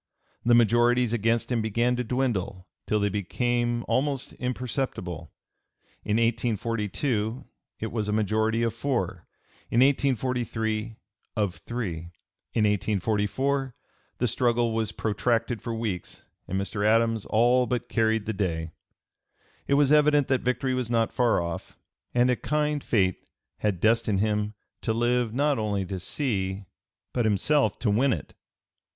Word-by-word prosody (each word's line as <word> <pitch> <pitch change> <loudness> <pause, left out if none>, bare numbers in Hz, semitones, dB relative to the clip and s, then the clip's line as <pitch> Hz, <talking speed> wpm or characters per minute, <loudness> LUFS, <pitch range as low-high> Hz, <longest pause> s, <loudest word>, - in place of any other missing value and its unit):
The 120 0 +5
majorities 120 +1 +4
against 115 +2 +1
him 120 -2 +1
began 120 +3 +1
to 125 - -1
dwindle 110 -7 -2 0.2
till 105 - +2
they 100 - +2
became 120 +4 -1
almost 135 -1 0
imperceptible; 125 - -3 0.7
in 105 - -1
1842 115 +1 -1 0.3
it 110 - -4
was 110 -3 -2
a - - 0
majority 110 +2 +1
of 115 - 0
four; 95 -11 -2 0.4
in 120 - +3
1843, 120 -5 0 0.4
of 100 -4 0
three; 95 0 -4 0.5
in 110 - +1
1844 110 +6 0 0.4
the 125 - +1
struggle 120 0 +1
was 110 -2 -1
protracted 115 +2 0
for 120 - -4
weeks, 110 -6 -4 0.2
and 95 - -1
Mr. 100 +1 -3
Adams 115 0 +2
all 120 +3 +3
but 125 +1 -2
carried 110 -2 +1
the 110 - -2
day. 85 -5 -2 1.0
It 140 - +3
was 145 -1 +4
evident 150 -2 +4
that 130 -2 +2
victory 130 +1 0
was 125 -2 -1
not 115 -1 +1
far 120 -3 +3
off, 85 -1 -5 0.3
and 125 +1 +3
a - - +2
kind 150 +1 -1
fate 95 -5 +1
(p. - - -37 0.3
306) - - -31
had 105 -4 0
destined 110 -1 +2
him 105 0 0 0.3
to 110 - 0
live 120 0 +1
not 140 +1 +1
only 100 -3 -1
to 95 +1 -4
see 95 - -2 0.5
but 120 - +1
himself 110 +3 +2
to 110 - 0
win 125 +5 +3
it. 75 - -6
115 Hz, 145 wpm, -26 LUFS, 105-125 Hz, 1.0 s, The